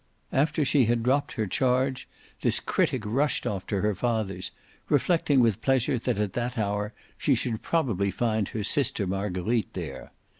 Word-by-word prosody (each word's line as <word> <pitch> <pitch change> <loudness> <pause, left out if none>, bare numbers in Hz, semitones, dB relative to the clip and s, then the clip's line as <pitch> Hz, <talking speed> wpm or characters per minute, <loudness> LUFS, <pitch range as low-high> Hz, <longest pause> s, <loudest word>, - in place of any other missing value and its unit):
After 150 +2 +2
she 135 -1 +4
had 115 0 +1
dropped 135 +4 +1
her 110 - -1
charge 130 +5 0 0.3
this - - +2
critic 125 -5 0
rushed 135 +8 +1
off 95 -3 -3
to 100 -2 -1
her 105 0 +2
father's, 100 -4 -1 0.4
reflecting 145 -2 +3
with 115 -5 +2
pleasure 130 -2 +2
that 110 - -1
at 105 -2 -1
that 120 +2 -2
hour 105 0 -1 0.3
she - - +3
should 115 -3 -2
probably 115 - 0
find 110 0 0
her 110 - -3
sister 110 -2 +1
Marguerite 95 +3 -1
there. 80 -7 -6
115 Hz, 160 wpm, -27 LUFS, 100-130 Hz, 0.4 s, she